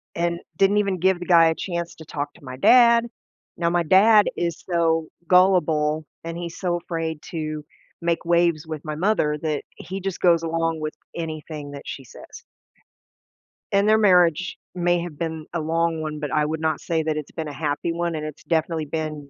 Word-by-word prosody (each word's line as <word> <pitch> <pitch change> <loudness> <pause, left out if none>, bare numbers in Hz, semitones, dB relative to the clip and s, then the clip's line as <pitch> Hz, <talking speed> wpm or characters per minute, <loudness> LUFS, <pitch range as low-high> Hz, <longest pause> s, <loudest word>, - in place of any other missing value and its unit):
and 170 0 -1 0.2
didn't 195 +1 +4
even 200 -2 +1
give 185 0 +2
the 175 - -6
guy 170 -2 +6
a 160 - +1
chance 170 -2 -4
to 160 - -12
talk 145 -1 -4
to - - -20
my 130 -1 -8
dad. 235 - +6 0.5
Now, 170 -1 +1
my 175 0 +1
dad 205 +5 +6
is 170 -1 -2
so 165 -2 +1 0.2
gullible 160 -5 +3 0.2
and 165 0 -5
he's 170 -1 -6
so 175 -2 0
afraid 165 -2 -4
to 155 -3 -4 0.4
make 170 0 -1
waves 170 -2 +2
with 155 -1 -6
my 155 - -3
mother 155 -4 +1
that 155 -3 -2
he 190 +2 -6
just 195 -1 -4
goes 170 -2 +4
along 165 0 -1
with 155 0 -3 0.2
anything 155 -3 -6
that 140 -1 -9
she 135 - -6
says. 125 - -13 1.3
And 200 +1 +3
their 215 0 +5
marriage 180 -4 +3 0.2
may 175 -1 +1
have 170 -4 -7
been 160 -1 -4
a 170 - -1
long 165 +1 0
one, 155 -1 -4
but 150 -2 -4
I 150 -1 +2
would 155 +1 -2
not 160 0 0
say 165 -1 -1
that 155 -1 -1
it's 150 - -6
been 160 -2 -5
a - - -7
happy 150 +2 -2
one, 170 0 -2
and 155 -1 -4
it's 155 -1 -8
definitely 160 -1 0
been 150 -1 -4
165 Hz, 195 wpm, -23 LUFS, 155-175 Hz, 1.3 s, guy